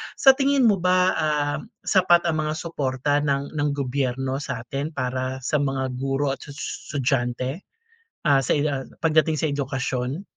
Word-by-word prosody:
sa 270 - +7
tingin 275 -1 +3
mo 205 - +3
ba, 185 +1 +3
ah, 150 -1 0 0.3
sapat 180 -3 +4
ang 155 - 0
mga 155 - -1
suporta 145 -3 -1
ng 140 0 -1
ng 145 0 +1
gobyerno 130 -1 -1
sa'tin 140 +3 -4
para 130 0 -3
sa 150 +4 0
mga 135 -2 -1
guro 135 +1 0
at - - -5
tsush 145 +1 -7
estudyante, 130 +2 -1 0.6
ah, 140 -3 +5
sa 130 - +1
i 145 - +1
ah, 135 -2 -3 0.2
pagdating 160 -1 +3
sa 155 0 0
edukasyon? 130 +2 -2
140 Hz, 155 wpm, -24 LUFS, 130-155 Hz, 0.6 s, sa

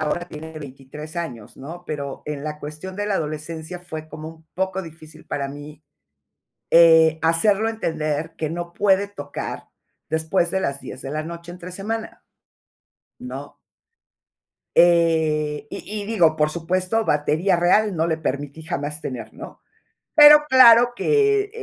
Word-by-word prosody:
ahora 175 +3 -2
tiene 160 +1 -9
23 145 +3 -10
años, 125 -11 -6
¿no? 170 +6 -9
Pero, 140 -3 -5
en 150 -1 -5
la 150 -1 -5
cuestión 155 +6 -8
de 205 0 -2
la 205 - 0
adolescencia, 160 +2 -5
fue 155 -3 -7
como 155 +1 -8
un 160 0 -15
poco 190 +1 -2
difícil 160 -1 -13
para 140 -1 -3
mí, 145 +2 -10 0.9
eh, 160 -1 +6
hacerlo 200 +7 +3
entender, 160 -6 -3
que 155 -2 -3
no 170 +1 -5
puede 200 0 +2
tocar, 145 -8 -7 0.4
después 160 +2 0
de 190 - -1
las 140 -5 -2
10 - - -9
de 135 - -6
la 155 +1 -3
noche, 170 +1 -8
entre 180 0 -9
semana, 220 +4 -5 0.9
¿no? - - -8 1.2
Eh, 160 -1 +3
y 210 0 -6
y - - -8
digo, 175 -8 +3
por 150 0 +2
supuesto, 185 +6 -1
batería 155 +5 +1
real, 195 +4 +3
no 165 0 0
le 160 -1 0
permití 145 0 -4
jamás 150 -2 -4
tener, 115 -5 -6
¿no? - - -11 0.5
Pero 295 0 +9
claro 245 -2 +7
que, 420 - +2
165 Hz, 145 wpm, -22 LUFS, 150-190 Hz, 1.2 s, Pero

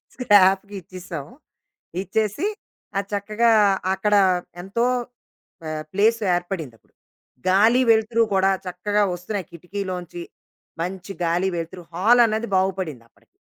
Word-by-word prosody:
స్క్రాప్‌కి 200 -3 +4
ఇచ్చేసాం. 175 -4 -8 0.8
ఇచ్చేసి 215 - -1 0.5
అది 200 0 -2
చక్కగా 215 +3 +2 0.4
అక్కడ 210 +2 0 0.5
ఎంతో 200 +6 -1 0.8
ప - - -12 0.3
ప్లేస్ 225 +4 +3
ఏర్పడింది 175 -8 -4
అప్పుడు. - - -36 0.5
గాలి, 220 +7 +5
వెలుతురు 225 +1 +3
కూడా 190 0 +3 0.2
చక్కగా 205 +3 0
వస్తున్నాయి 180 +1 -5
కిటికీలోంచి. 180 0 -6 0.6
మంచి 185 +2 -5
గాలి, 175 +3 +1
వెలుతురు, 170 +2 -6
హాలన్నది 225 +3 +3
బాగుపడింది 185 -9 -1
అప్పటికి. - - -33
195 Hz, 100 wpm, -23 LUFS, 180-215 Hz, 0.8 s, గాలి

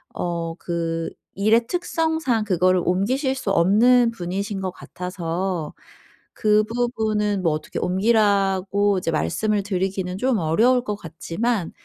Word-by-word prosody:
어 170 -1 -3
그 165 -1 -2 0.3
일의 225 +4 +3
특성상 320 -8 0
그거를 185 -1 +2
옮기실 255 - 0
수 220 -6 -3
없는 230 +7 +4
분이신 195 +1 -4
것 185 - -2
같아서 180 -2 -4 0.6
그 210 0 +3
부분은 215 -4 -1
뭐 165 - +3
어떻게 155 0 -5
옮기라고 200 0 +2
이제 165 - -2
말씀을 210 +6 0
드리기는 190 -1 -2
좀 255 -1 +1
어려울 230 +10 +3
것 210 -4 -3
같지만 180 +4 -3
200 Hz, 265 characters per minute, -22 LUFS, 180-225 Hz, 0.6 s, 없는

